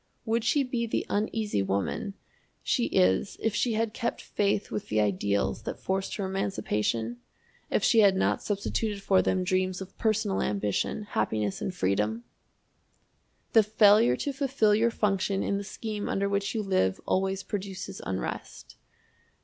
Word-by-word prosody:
Would 225 0 +1
she 285 +4 +3
be 245 -2 -2
the - - -1
Uneasy 210 - 0
Woman 95 0 -2 0.5
she - - +1
is 95 - +2
if 225 - 0
she 230 +2 +1
had 220 0 0
kept 235 -1 -2
faith 200 0 -1
with 210 - -4
the 110 - +1
ideals 100 0 0
that - - -5
forced 190 0 -2
her 200 - -2
emancipation? 120 - -1 0.5
if - - +1
she 225 - +5
had 200 -3 +6
not 190 - +1
substituted 205 0 -2
for 190 -1 +4
them 185 -1 +1
dreams 185 0 0
of 190 -1 -9
personal 215 -3 +1
ambition, 105 - -1
happiness, 110 - -1
and 185 - -3
freedom! 105 - 0 1.3
The 225 - +8
failure 210 - +5
to 285 - -3
fulfill 265 -6 +2
your 225 +3 +3
function 195 -3 0
in 200 - 0
the - - -5
scheme 210 0 -5
under 200 0 0
which 200 +2 -1
you 220 - 0
live 185 - +1
always 190 +1 0
produces 190 -1 -5
unrest. 95 -1 -5
195 Hz, 155 wpm, -28 LUFS, -, 1.3 s, The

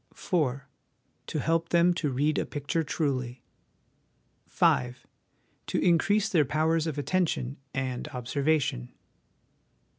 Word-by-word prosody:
" - - -30
4. 140 -7 -1 0.6
To 155 - -2
help 165 +2 0
them 175 +1 +4
to 165 -4 -1
read 145 +4 +1
a - - -1
picture 145 +3 -2
truly. 130 -6 -2 0.5
" - - -43
5. 125 +1 +1 0.6
To - - -1
increase 195 +4 +3
their 175 -8 +3
powers 155 +3 +1
of 155 -2 -3
attention 145 -5 -1
and 130 -2 -3
observation. 130 - -1
150 Hz, 120 wpm, -28 LUFS, 130-165 Hz, 0.6 s, them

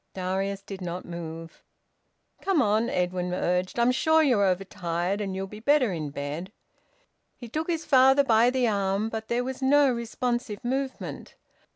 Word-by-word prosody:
Darius 195 +1 -2
did 195 -1 -8
not 180 0 -5
move. 165 -1 -8 0.8
"Come 390 -5 +1
on," 220 -1 +2
Edwin 180 -4 -1
urged. 180 +3 -1
"I'm 235 +1 +4
sure 315 +5 +3
you're 245 -9 +3
overtired, 185 0 -1
and 195 -2 -3
you'll 190 0 -3
be 210 +2 -10
better 255 -3 +3
in 155 -3 -4
bed." 145 +6 -5 0.8
He 240 - -10
took 310 +8 -3
his 330 -2 -1
father 265 0 +5
by 235 -2 +4
the 255 -1 +1
arm, 200 0 0
but 220 0 -5
there 240 +1 0
was 260 +1 -5
no 280 0 +4
responsive 240 -2 -3
movement. 265 +2 -4
215 Hz, 160 wpm, -26 LUFS, 185-255 Hz, 0.8 s, father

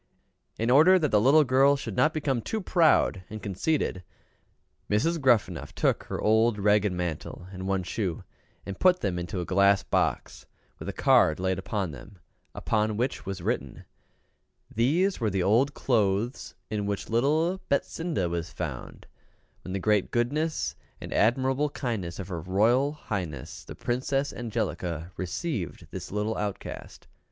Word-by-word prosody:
In 115 +2 0
order 160 +8 +7
that 155 -6 0
the 105 - +4
little 145 +6 +6
girl 135 +1 +4
should 115 -7 -5
not 155 - +3
become 145 -6 -1
too 220 - -3
proud 165 - +3
and 110 +1 -6
conceited, 100 - -1 0.9
Mrs. 160 +11 +1
Gruffanuff 120 -6 +1
took - - +1
her - - -4
old 110 +1 +3
ragged 105 0 +3
mantle 90 -1 -4
and 95 0 -6
one 95 -1 0
shoe, 90 -1 -3 0.4
and 100 -1 -6
put 185 -1 +4
them 90 -3 -1
into 85 +1 -4
a - - -4
glass 100 +2 +3
box, - - -1 0.3
with - - -6
a - - -1
card 80 - +3
laid 95 0 0
upon 95 -2 -3
them, 75 +9 -12 0.4
upon 110 -1 0
which 125 -2 -2
was 95 -3 -5
written, - - -3 0.9
"These 165 - +2
were 110 -3 +1
the 95 -2 0
old 120 +9 +3
clothes 110 0 0 0.2
in 105 -2 -2
which 100 -1 -3
little 155 +10 +1
BETSINDA 150 - -1
was 85 0 -3
found - - -6 0.6
when 95 - -6
the - - 0
great 105 0 +2
goodness 120 - -1 0.2
and - - -7
admirable 130 +5 +2
kindness 110 - -4
of 95 - -6
her 85 -3 -4
Royal 115 - +2
Highness 90 - -5
the - - -9
Princess 135 +3 -1
Angelica, 95 -8 -3
received 95 - -4
this - - -7
little 105 +2 -1
outcast." 105 -2 -6
110 Hz, 150 wpm, -27 LUFS, 95-135 Hz, 0.9 s, order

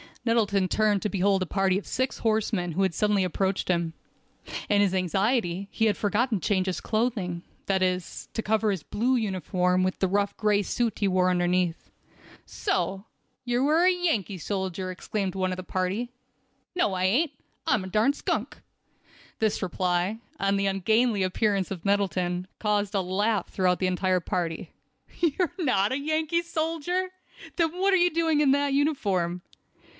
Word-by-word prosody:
Nettleton 205 -5 +2
turned 210 0 +2
to 210 - 0
behold 195 0 +2
a - - +1
party 195 0 +1
of - - -13
six 260 +2 -1
horsemen 215 -5 0
who 190 +5 0
had 190 -3 +1
suddenly 210 -1 +2
approached 190 +2 -1
him. 170 -2 0 0.7
In 205 -1 +3
his 195 -2 +2
anxiety 195 +1 0
he 225 - +1
had 215 - +2
forgotten 215 +1 +1
to - - -3
change 190 -3 +2
his 185 - -2
clothing—that 195 -4 -2
is, 180 -1 -2
to 225 - -1
cover 220 0 +1
his 190 -5 -1
blue 245 +5 0
uniform 185 -4 0
with 185 0 0
the 190 - +2
rough 200 +1 0
gray 210 -2 +2
suit 230 +2 -1
he 200 - +2
wore 185 -1 +3
underneath. 175 -1 0 0.6
"So, 195 - -2 0.4
you 245 +3 +1
are 320 +4 +4
a 370 - +6
Yankee 315 - 0
soldier," 190 0 -3
exclaimed 190 +1 -3
one 185 -1 0
of 185 - -3
the 185 - -5
party. 185 +6 -2 0.7
"No 280 - +1
I 185 0 -1
ain't; 270 - +2 0.4
I'm 210 - +2
a - - -6
darn 215 +8 +2
skunk." - - -3 0.8
This 220 -2 +1
reply, 180 +2 0 0.2
and 195 0 +1
the 200 - +1
ungainly 215 +3 +2
appearance 195 0 0
of 185 -2 -6
Nettleton, 185 -2 0
caused 210 -1 0
a 195 - +2
laugh 200 +4 0
throughout 180 -2 +1
the 185 - +1
entire 185 0 +1
party. 170 -2 -3 0.5
"You 335 -4 +2
are 355 -2 +1
not 210 - +2
a 260 - 0
Yankee 315 +3 0
soldier? 335 +2 -1 0.5
Then 330 -3 +2
what 390 +1 +3
are - - +6
you 355 0 +3
doing 325 -2 +2
with 290 -3 +4
that 285 0 +2
uniform?" 195 - 0
200 Hz, 170 wpm, -27 LUFS, 185-240 Hz, 0.8 s, a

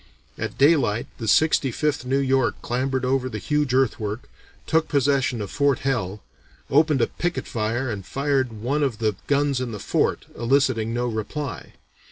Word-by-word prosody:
At - - -5
daylight 135 -7 +3
the 115 - -4
Sixty 150 +3 +4
fifth 145 +1 -1
New 130 +2 +1
York 135 -2 +1
clambered 130 +1 -1
over 130 0 +1
the 110 - -5
huge 150 +4 0
earthwork, 115 -4 0 0.4
took 160 0 +2
possession 135 -5 +1
of 100 - -7
Fort 140 -2 +2
Hell, 105 -7 -1 0.5
opened 150 -1 +4
a - - +5
picket 175 0 -3
fire 115 +3 -2
and 100 -3 -5
fired 135 +2 0
one 120 +7 -2
of 135 -6 0
the 110 -2 0
guns 140 -2 +1
in 120 -3 -3
the 105 - -5
fort, - - 0
eliciting 120 -2 +1
no 120 +1 -1
reply. 120 +5 -4
130 Hz, 165 wpm, -24 LUFS, 115-140 Hz, 0.5 s, a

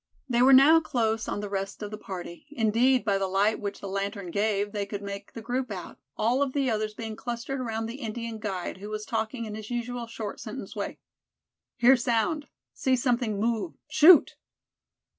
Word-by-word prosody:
They 240 -2 +2
were 260 +2 +7
now 280 +5 +8
close 225 -8 -1
on 205 - -2
the 205 - -4
rest 195 +1 -4
of 205 - -5
the 215 - -5
party; 180 +2 -8
indeed, 245 -1 +2
by 200 -2 +2
the 195 - 0
light 200 +3 +2
which 200 -1 -5
the 200 - -5
lantern 200 -1 -3
gave, 205 +1 0
they 205 -1 -2
could 200 0 -5
make 200 0 -7
the 230 - -8
group 250 +2 -2
out, 185 -4 -7 0.2
all 240 +5 +2
of 275 -2 0
the 275 -3 +1
others 215 -1 -2
being 220 -1 -5
clustered 240 +4 -4
around 225 -3 -2
the 230 +3 -6
Indian 230 0 -5
guide, 190 -5 -4
who 205 +2 -8
was 215 0 -4
talking 225 +1 -2
in 215 - -6
his 215 0 -7
usual 240 0 -3
short 220 -2 -6
sentence - - -7
way. - - -4 0.8
"Hear 250 +2 +7
sound, 245 +5 0 0.3
see 260 -1 +1
something 240 -4 0
move, 220 -5 0 0.2
shoot!" 310 +1 +7
225 Hz, 195 wpm, -27 LUFS, 205-245 Hz, 0.8 s, now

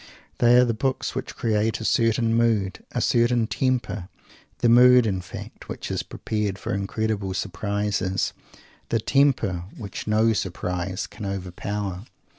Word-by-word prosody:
They 120 0 +6
are 125 - +6
the 115 - 0
books 130 +4 -1
which - - -5
create 110 0 0
a 110 - -5
certain 115 0 +2
mood, 110 -5 +1
a - - -1
certain 120 -1 +3
temper 110 -6 -1 0.5
the - - +2
mood, 125 +1 +7
in 95 -4 -1
fact, 90 - -10
which - - -5
is - - -1
prepared 105 -3 -3
for - - -4
incredible 100 -1 -2
surprises 100 0 -1 0.6
the 115 - +1
temper 115 -9 +2
which 100 -2 -7
no 110 +1 +3
surprise 90 -1 -3
can 105 - -10
overpower. 100 +1 -4
105 Hz, 140 wpm, -24 LUFS, 95-115 Hz, 0.6 s, mood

